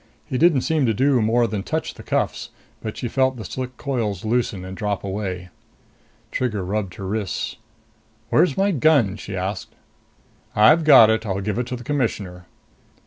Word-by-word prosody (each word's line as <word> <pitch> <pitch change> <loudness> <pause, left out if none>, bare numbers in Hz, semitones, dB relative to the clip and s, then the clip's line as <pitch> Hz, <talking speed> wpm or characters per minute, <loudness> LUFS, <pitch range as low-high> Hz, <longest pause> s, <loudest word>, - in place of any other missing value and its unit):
He 130 - -3
didn't 160 -5 +4
seem 155 -4 +1
to 110 - +1
do 130 +1 +3
more 115 +2 +3
than 105 -3 -3
touch - - -3
the - - -12
cuffs, - - -2 0.3
but 110 - -5
she 120 - -3
felt 130 +1 +1
the 110 - -7
slick 130 +4 -6
coils 115 -9 -2
loosen 110 -5 -1
and 95 0 -7
drop 105 -1 -2
away. 95 -2 -4 0.8
Trigger 105 -7 -2
rubbed 100 -1 -3
her 95 - -7
wrists. 100 0 -3 0.7
"Where's 155 -7 +3
my 200 +1 +2
gun?" 140 - +3
she 100 -1 -7
asked. 95 +1 -4 0.8
"I've 155 +10 +5
got 130 -7 +8
it. 110 0 0
I'll 100 -3 -2
give 105 +3 -2
it 125 - -2
to 125 - -3
the 120 - -9
Commissioner." 105 - -3
110 Hz, 175 wpm, -22 LUFS, 100-130 Hz, 0.8 s, got